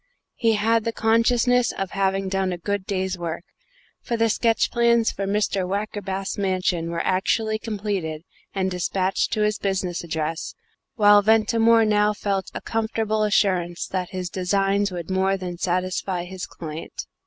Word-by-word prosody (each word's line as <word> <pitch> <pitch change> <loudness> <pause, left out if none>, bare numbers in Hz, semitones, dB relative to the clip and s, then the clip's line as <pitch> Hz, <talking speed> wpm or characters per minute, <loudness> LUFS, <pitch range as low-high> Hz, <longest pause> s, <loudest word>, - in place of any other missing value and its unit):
He 230 -2 +2
had 225 +2 +2
the 230 - -1
consciousness 235 +2 +3
of 195 -1 -4
having 195 0 0
done 190 -1 0
a 175 - -3
good 200 +2 -3
day's 190 -2 -2
work, 170 0 -4 0.6
for 235 - -2
the 230 0 +2
sketch 225 +1 +2
plans 235 -1 +3
for 195 - -4
Mr. 200 -2 0
Wackerbath's 195 -1 -3
mansion 185 -3 0
were 170 0 -2
actually 215 +4 +1
completed 200 -8 -3 0.3
and 190 -1 -1
despatched 185 +1 0
to 215 - 0
his 210 0 +1
business 185 -3 -2
address, 160 -1 -3 0.4
while 205 -2 +6
Ventimore 225 +1 +4
now 210 0 +3
felt 200 -2 -2
a - - -4
comfortable 220 -1 -1
assurance 185 -5 +1
that 185 -2 -3
his 185 -2 -5
designs 195 +2 +1
would 175 0 -5
more 190 +1 +2
than 180 -2 -6
satisfy 185 0 -1
his 185 0 -7
client. 160 -1 -7
195 Hz, 155 wpm, -23 LUFS, 185-215 Hz, 0.6 s, while